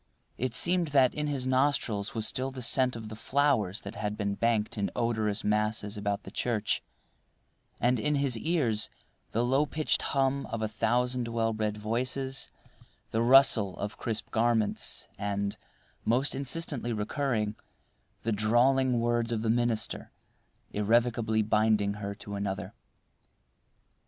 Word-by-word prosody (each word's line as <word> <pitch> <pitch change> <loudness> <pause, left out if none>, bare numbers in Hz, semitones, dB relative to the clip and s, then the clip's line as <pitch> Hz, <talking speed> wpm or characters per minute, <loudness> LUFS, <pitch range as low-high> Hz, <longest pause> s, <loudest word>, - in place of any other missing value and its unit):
It 130 +1 -1
seemed 175 -1 +3
that 135 -3 +4
in 150 0 -2
his 140 -3 -2
nostrils 130 -6 +1
was 110 -1 0
still 130 +1 +1
the 130 -1 -6
scent 130 +1 +4
of 110 -1 -7
the 110 - -7
flowers 115 -5 +1
that - - -7
had 105 0 -3
been 100 -1 -1
banked 110 0 0
in 100 -2 -1
odorous 110 -4 0
masses 105 0 0
about 100 0 -2
the 95 - -10
church, 115 -1 -1 1.0
and 120 +1 +2
in 150 +5 +1
his 140 -3 +1
ears 120 -6 0 0.4
the 115 +2 +1
lowpitched 145 +4 +1
hum 135 0 0
of 115 -1 -4
a - - +1
thousand 120 +3 0
well 115 -1 0
bred 105 -1 -2
voices, 130 +5 -2 0.6
the 110 - +1
rustle 120 -6 +5
of 105 +1 -5
crisp 110 -2 -3
garments, 115 -2 0
and, 100 0 -2 0.5
most 125 +5 +1
insistently 135 -3 -2
recurring, 110 -1 -1 0.7
the 115 - 0
drawling 120 +4 +3
words 120 0 +1
of 110 -1 -1
the 110 - +2
minister 120 -2 -1 0.6
irrevocably 110 +1 +2
binding 105 -1 +2
her 100 -1 -5
to 100 0 -9
another. 100 -1 -3
115 Hz, 140 wpm, -29 LUFS, 105-130 Hz, 1.0 s, rustle